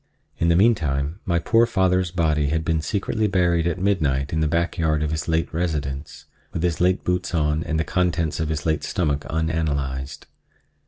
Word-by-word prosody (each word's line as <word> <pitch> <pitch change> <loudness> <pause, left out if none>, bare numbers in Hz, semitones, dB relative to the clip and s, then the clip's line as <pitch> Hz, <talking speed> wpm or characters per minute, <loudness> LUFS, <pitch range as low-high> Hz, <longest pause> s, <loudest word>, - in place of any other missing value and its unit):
In 85 - +2
the 85 - +4
meantime 80 -6 +2
my 85 -4 +1
poor 115 +7 +3
father's 95 -4 +1
body 80 -4 +1
had 80 +2 -1
been 80 -1 +1
secretly 105 +6 -1
buried 85 -3 +2
at 85 - -1
midnight 75 -8 0
in 80 - +1
the 80 - +2
back 85 +3 -1
yard 80 -2 +1
of 75 - -1
his 80 -2 -3
late 80 0 0
residence, 75 -4 -3 0.3
with - - -3
his 85 -1 0
late 90 +1 +2
boots 90 -1 -1
on 75 0 +1
and 80 -1 -2
the - - +2
contents 85 -2 0
of 80 -1 -1
his 75 -2 -3
late 80 -2 0
stomach 75 -5 -1
unanalyzed. 75 -4 -2
80 Hz, 190 wpm, -23 LUFS, 75-90 Hz, 0.3 s, the